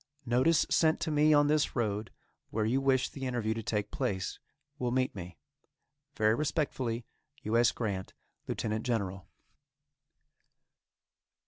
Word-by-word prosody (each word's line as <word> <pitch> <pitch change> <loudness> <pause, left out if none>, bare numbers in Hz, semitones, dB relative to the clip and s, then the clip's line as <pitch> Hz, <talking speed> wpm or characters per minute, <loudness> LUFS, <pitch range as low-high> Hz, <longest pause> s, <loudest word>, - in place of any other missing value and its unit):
Notice 130 +7 +3
sent 160 -1 +3
to 160 - -1
me 150 +1 +4
on 145 -1 +6
this 150 0 +2
road 110 -3 -1 0.4
where 110 0 0
you 130 +5 +1
wish 135 -1 +3
the 135 -2 -4
interview 120 -3 0
to 115 - -4
take 105 -1 -2
place, 95 -2 -2 0.4
will 125 - 0
meet 130 +1 +1
me. 90 -3 -8 0.8
Very 110 0 +3
respectfully. 130 -4 -1 0.4
U. 110 +2 -1
S. 120 0 +5
GRANT, 100 -5 -4 0.3
Lieutenant 110 0 -2
General. 95 -6 -2
120 Hz, 130 wpm, -31 LUFS, 110-135 Hz, 0.8 s, on